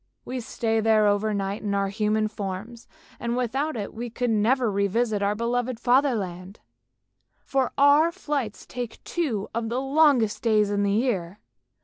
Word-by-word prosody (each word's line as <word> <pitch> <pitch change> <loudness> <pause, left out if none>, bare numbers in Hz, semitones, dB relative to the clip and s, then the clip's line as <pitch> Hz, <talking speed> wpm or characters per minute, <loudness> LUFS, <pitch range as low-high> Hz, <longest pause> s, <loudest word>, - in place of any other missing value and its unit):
We 255 0 -4
stay 225 -1 -1
there 220 -1 +3
over 205 +1 +2
night 200 0 -2
in 200 -1 -1
our 195 0 0
human 215 +1 0
forms, 210 +3 -6 0.3
and 235 0 -2
without 265 +4 -1
it 205 - -5
we 240 +2 -5
could 245 +1 -1
never 225 +2 +2
revisit 200 +2 0
our 200 +1 +1
beloved 240 +1 -1
Fatherland, 215 -8 0 0.9
for 270 -2 0
our 290 +4 +5
flight 290 - -4
takes 245 -2 -6
two 250 - -2
of 225 0 -2
the 240 +2 -1
longest 270 -5 +3
days 215 -3 +2
in 205 0 0
the 200 0 +1
year. 205 -5 -1
225 Hz, 155 wpm, -25 LUFS, 205-250 Hz, 0.9 s, our